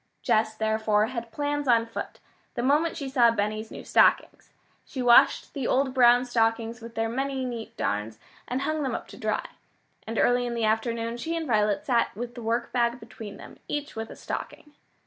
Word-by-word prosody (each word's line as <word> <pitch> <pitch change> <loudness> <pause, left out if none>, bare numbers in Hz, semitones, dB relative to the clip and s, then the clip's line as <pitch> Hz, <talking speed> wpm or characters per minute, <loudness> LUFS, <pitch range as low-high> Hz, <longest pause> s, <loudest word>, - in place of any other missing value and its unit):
Jess, 220 0 +2
therefore, 220 -1 +1
had 235 -1 -6
plans 290 +3 -2
on 230 -2 +4
foot, 230 - -7 0.4
the 240 - -2
moment 300 +6 +2
she 280 -4 -4
saw 250 -3 +4
Benny's 215 0 -2
new - - -9
stockings. - - +2 0.3
She 270 - -9
washed 245 -1 +5
the 275 -4 -2
old 265 0 +1
brown 245 -1 +5
stockings 225 -1 0
with 230 0 -10
their 225 0 0
many 265 +2 -2
neat 230 -2 -6
darns, 105 - -2 0.3
and 255 +2 -2
hung 310 +2 -1
them 260 -4 -1
up - - -6
to - - -11
dry. - - -2 0.6
And 225 0 -4
early 245 0 +3
in 240 - -3
the 230 -1 0
afternoon 230 +1 -1
she 325 +7 -3
and 330 -1 -2
Violet 210 -5 +1
sat 240 -6 +1
with 240 +2 -5
the 240 - -8
workbag 235 +1 0
between 220 -3 -10
them, - - -13
each 295 0 -4
with 225 0 -5
a - - -9
stocking. 295 - -7
235 Hz, 190 wpm, -26 LUFS, 225-260 Hz, 0.6 s, washed